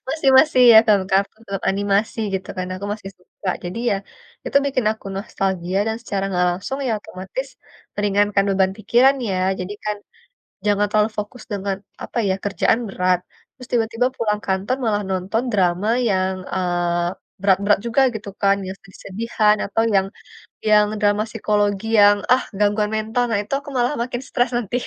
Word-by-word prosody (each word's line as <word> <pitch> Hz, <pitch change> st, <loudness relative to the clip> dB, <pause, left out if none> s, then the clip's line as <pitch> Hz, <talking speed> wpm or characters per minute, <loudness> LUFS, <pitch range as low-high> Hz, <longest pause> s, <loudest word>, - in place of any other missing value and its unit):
masih 280 Hz, 0 st, 0 dB
masih 265 Hz, -4 st, +5 dB
ya 220 Hz, -, +10 dB
film 205 Hz, -3 st, +4 dB
kartun 200 Hz, +3 st, +1 dB
atau 195 Hz, -1 st, -2 dB
animasi, 200 Hz, +3 st, 0 dB, 0.2 s
gitu 190 Hz, -, -4 dB
kan, 185 Hz, 0 st, -3 dB
aku 200 Hz, -, -7 dB
masih 195 Hz, -2 st, -9 dB
suka. 180 Hz, +1 st, -9 dB, 0.2 s
Jadi 180 Hz, +5 st, -5 dB
ya, 200 Hz, -, +2 dB, 0.5 s
itu -, -, -1 dB
bikin 255 Hz, -4 st, 0 dB
aku 220 Hz, -, -14 dB
nostalgia 190 Hz, -2 st, -2 dB
dan 220 Hz, -, -1 dB
secara 200 Hz, -4 st, -2 dB
enggak 180 Hz, -2 st, +1 dB
langsung 195 Hz, +10 st, -4 dB
ya -, -, +1 dB
otomatis, 200 Hz, -, -6 dB, 0.5 s
meringankan 205 Hz, 0 st, +2 dB
beban 190 Hz, -1 st, +2 dB
pikiran 245 Hz, +6 st, +4 dB
ya. 185 Hz, -, -1 dB, 0.2 s
Jadi 190 Hz, +3 st, -5 dB
kan, 210 Hz, 0 st, -1 dB, 0.7 s
jangan 205 Hz, 0 st, +3 dB
terlalu 215 Hz, +1 st, +3 dB
fokus 215 Hz, +3 st, -7 dB
dengan 195 Hz, -1 st, -2 dB, 0.3 s
apa -, -, -6 dB
ya, 190 Hz, -, +2 dB
kerjaan 205 Hz, +3 st, +1 dB
berat, 180 Hz, -1 st, +1 dB, 0.4 s
terus 250 Hz, -2 st, -12 dB
tiba-tiba 230 Hz, +1 st, +1 dB
pulang 210 Hz, -2 st, -1 dB
kantor, 195 Hz, +6 st, 0 dB
malah 210 Hz, -1 st, +1 dB
nonton 190 Hz, +5 st, -1 dB
drama 190 Hz, 0 st, +1 dB, 0.2 s
yang, 190 Hz, 0 st, +1 dB, 0.2 s
eee, 175 Hz, -1 st, 0 dB, 0.3 s
berat-berat 200 Hz, +1 st, +3 dB
juga 235 Hz, +4 st, +2 dB
gitu 205 Hz, -2 st, -6 dB
kan, 200 Hz, -1 st, +4 dB
yang 190 Hz, +1 st, -6 dB
sedih-sedihan 210 Hz, +2 st, -1 dB
atau 225 Hz, +3 st, 0 dB
yang 190 Hz, 0 st, +3 dB, 0.6 s
yang 210 Hz, 0 st, +6 dB
drama 205 Hz, 0 st, +2 dB
psikologi 205 Hz, -1 st, 0 dB
yang, 205 Hz, 0 st, +7 dB, 0.2 s
ah, 255 Hz, -, +4 dB, 0.2 s
gangguan 210 Hz, 0 st, +1 dB
mental. 220 Hz, +3 st, 0 dB
Nah 215 Hz, -, +1 dB
itu 210 Hz, -, -15 dB
aku 285 Hz, +1 st, -10 dB
malah 245 Hz, +3 st, +1 dB
makin 245 Hz, +1 st, -4 dB
stres 245 Hz, +2 st, +1 dB
nanti. 240 Hz, -1 st, -2 dB
205 Hz, 165 wpm, -21 LUFS, 190-225 Hz, 0.7 s, ya